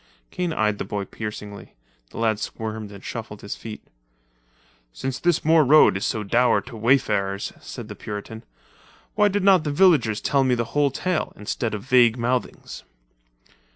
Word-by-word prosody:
Kane 180 -2 -2
eyed 105 -8 0
the - - -1
boy 100 -1 -4
piercingly. 105 -1 -8 0.3
The - - -12
lad 110 -2 +1
squirmed 110 -1 -5
and 100 -1 -12
shuffled 110 -3 -7
his 100 - -5
feet. 110 -2 -9 1.1
"Since 130 - -4
this 175 -3 +1
moor 160 0 +5
road 140 -8 +6
is 95 - -1
so 110 - -2
dour 120 +4 +3
to 125 -2 -11
wayfarers," 105 -5 +1
said - - -8
the - - -7
Puritan, 105 +2 -7 0.7
"why 210 - +4
did 205 -1 -1
not 190 -4 +5
the 150 - -2
villagers 145 - +3
tell 140 -2 +1
me 130 -1 +2
the 120 -1 -1
whole 145 -1 +3
tale, 175 +5 -2
instead 110 +2 -3
of 100 - -7
vague 125 -2 +4
mouthings?" 125 +1 -3
115 Hz, 165 wpm, -23 LUFS, 105-145 Hz, 1.1 s, road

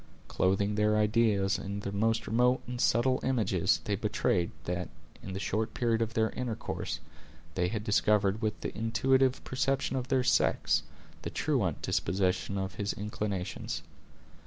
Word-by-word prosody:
Clothing 95 +2 +1
their 105 0 +2
ideas 105 -2 +2
in 100 +1 -4
the 100 - -4
most 110 +2 +1
remote 125 +3 +2
and 125 0 -4
subtle 130 +3 +3
images, 100 -8 +1
they 105 - 0
betrayed, 100 -4 0
that, 90 0 -3 0.3
in 95 - -7
the 95 - -3
short 110 +3 -2
period 115 -2 +1
of 115 0 -2
their 110 0 +2
intercourse, 125 -3 -4 0.5
they 90 0 +1
had 105 +2 -3
discovered, 105 -1 +2
with 110 -2 -1
the - - -4
intuitive 130 +4 +2
perception 135 +1 0
of 130 -1 -2
their 130 -1 +2
sex, - - +2 0.4
the - - -4
truant - - 0
disposition 95 +1 0
of 95 -1 -3
his 100 - -1
inclinations. 100 -3 -4
105 Hz, 150 wpm, -30 LUFS, 100-120 Hz, 0.5 s, subtle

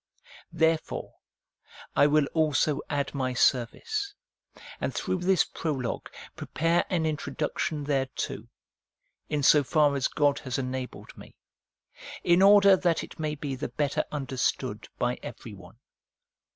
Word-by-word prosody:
Therefore 160 0 0 0.8
I 145 - +6
will 150 0 +3
also 155 -2 +2
add 145 -2 -1
my 130 -2 -2
service, 400 - 0 0.6
and - - -3
through 185 - -1
this 180 -1 +3
prologue 135 -7 -4 0.3
prepare 165 +2 0
an 170 -4 0
introduction 150 0 -2
thereto, 135 -2 -2 0.8
in 145 -1 -1
so 145 +1 +6
far 145 +1 +3
as 135 -1 +1
God 145 -1 +1
has 130 -2 -4
enabled 130 -1 -5
me, - - -14 0.9
in 175 +1 +4
order 200 0 +7
that 175 -3 +1
it - - -11
may 155 -1 -2
be 140 -1 -4
the 135 +3 -4
better 145 -2 -1
under 135 -3 -4
stood - - -1
by - - -1
everyone. - - -10
150 Hz, 125 wpm, -27 LUFS, 135-165 Hz, 0.9 s, order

